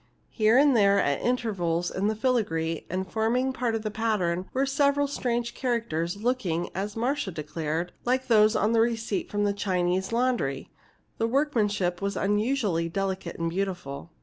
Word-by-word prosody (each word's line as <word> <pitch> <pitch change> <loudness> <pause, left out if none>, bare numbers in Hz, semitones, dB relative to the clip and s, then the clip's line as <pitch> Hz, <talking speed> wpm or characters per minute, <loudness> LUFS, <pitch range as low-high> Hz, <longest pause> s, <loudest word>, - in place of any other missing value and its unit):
Here 220 +2 +3
and 280 -1 +5
there, 200 -2 +5
at 140 -6 +1
intervals 185 -9 0
in 195 +2 -1
the 220 - 0
filigree, 180 - -1
and 185 +2 -2
forming 235 +6 0
part 245 -3 -1
of 220 - -3
the 215 - -2
pattern, 190 -5 -1
were 265 +1 +1
several 280 +1 +2
strange 240 -4 -2
characters, 210 -9 -2
looking, 200 -8 -1
as 200 +2 -4
Marcia 255 +1 -1
declared, 160 +1 -3
like 255 +1 +1
those 215 -2 +5
on 210 - +2
the 230 -1 +4
receipt 225 -4 -1
from 205 0 0
a 200 - +1
Chinese 185 -1 0
laundry. 230 - 0 0.5
The 225 - +2
workmanship 210 -9 0
was 200 0 -2
unusually 205 -5 0
delicate 190 -1 -3
and 165 0 -1
beautiful. 175 -6 -4
205 Hz, 160 wpm, -27 LUFS, 175-240 Hz, 0.5 s, and